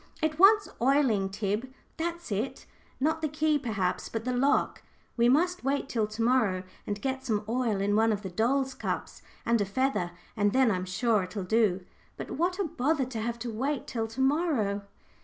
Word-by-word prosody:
"It 315 -1 -1
wants 410 +2 +7
oiling, 245 -7 +3
Tib 210 +5 -2 0.3
that's 340 -3 -4
it; 215 +7 -3 0.3
not 315 +4 +1
the 310 - +1
key, 305 0 +1
perhaps, 200 -8 -2
but 225 0 -4
the 250 - 0
lock. 275 +3 +2 0.3
We 235 0 +4
must 350 +6 +2
wait 275 +1 0
till 225 -5 0
to 215 +2 -6
morrow, 220 -7 +2 0.2
and 205 0 -2
get 265 +2 -2
some 215 -4 -1
oil 230 -3 0
in 200 +1 +1
one 225 +1 +4
of 205 0 -2
the 190 - -5
doll's 260 +7 +1
cups, - - -4 0.2
and 235 -2 +2
a - - +1
feather, 260 -3 0 0.3
and 205 -2 +2
then 260 -3 +4
I'm 185 -2 -1
sure 215 +3 +1
it'll 185 +2 -5
do. 190 -2 +2 0.3
But - - -6
what 355 +4 0
a 400 - 0
bother 290 -2 0
to 245 -3 -5
have 235 +1 -2
to 235 - -3
wait 265 +5 -2
till 225 -3 -3
to 225 +4 -5
morrow!" 265 - +1
240 Hz, 195 wpm, -29 LUFS, 210-280 Hz, 0.3 s, wants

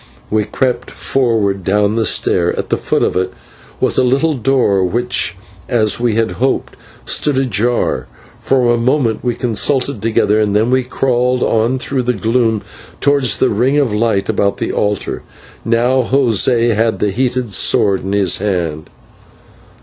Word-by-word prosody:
We 105 -1 +1
crept 130 +2 -2
forward 110 -7 -1
down 105 +2 +1
the 110 -2 0
stair. 85 -1 +1
At - - -4
the - - +2
foot - - 0
of - - 0
it 95 0 -1 0.5
was - - +2
a - - +3
little 140 +6 +1
door, 125 -7 +1
which, 120 +1 0 0.3
as 110 -4 +2
we 120 -3 0
had 115 0 0
hoped, 135 - -1 0.3
stood 145 -3 +1
ajar. 120 -2 0 0.3
For 125 -3 +1
a - - +1
moment 120 -1 0
we 120 -2 -1
consulted 125 +1 0
together, 110 -1 +1
then 105 +3 +1
we 130 0 +3
crawled 125 0 0
on 115 +3 +1
through 130 0 -2
the 125 0 0
gloom 115 0 0 0.4
towards 140 -3 +2
the 130 - +1
ring 125 +7 +1
of 135 -7 +1
light 105 -2 0
about 100 -2 0
the - - -3
altar. 105 -1 -2 0.4
Now 120 +3 +1
José 120 -2 +2
had 110 +1 0
the 105 - -1
heated 125 -1 -2
sword 95 +2 +2
in 95 +1 -3
his 100 -3 +2
hand. 85 -6 -3
115 Hz, 155 wpm, -15 LUFS, 105-130 Hz, 0.5 s, a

